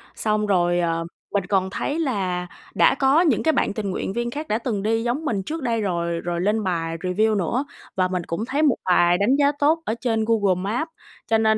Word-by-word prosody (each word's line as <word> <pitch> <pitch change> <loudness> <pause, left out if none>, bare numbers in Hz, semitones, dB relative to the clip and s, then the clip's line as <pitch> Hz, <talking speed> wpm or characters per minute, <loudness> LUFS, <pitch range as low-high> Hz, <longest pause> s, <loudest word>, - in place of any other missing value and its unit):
Xong 215 -1 0
rồi, 175 -3 +2
ờ, 165 -1 0 0.3
mình 200 -3 0
còn 190 0 +1
thấy 285 +10 -2
là 190 - -1 0.3
đã - - +5
có 275 +4 +4
những 305 -10 +2
cái 320 - +4
bạn - - 0
tình 205 -2 -3
nguyện 190 - -3
viên 240 +1 -2
khác 300 +4 -5
đã 215 - +1
từng 225 -4 -3
đi 225 +1 +1
giống 250 +7 -2
mình 205 -9 -1
trước 315 - -5
đây 230 -3 0
rồi, 170 -3 -1
rồi 175 0 -2
lên 210 +3 +1
bài 165 -3 -2
review 205 +6 +1
nữa. 210 - 0 0.3
Và 185 -1 +2
mình 180 -1 -2
cũng 170 +7 -3
thấy 275 +4 -1
một 285 -6 +4
bài 175 -1 +4
đánh 210 +8 +3
giá 285 0 +3
tốt 315 +3 +3
ở 220 - 0
trên 225 -3 0
Google 205 -5 +3
Maps, 240 +11 -2 0.4
cho 225 - +3
nên 220 0 +3
215 Hz, 230 wpm, -23 LUFS, 180-245 Hz, 0.4 s, đã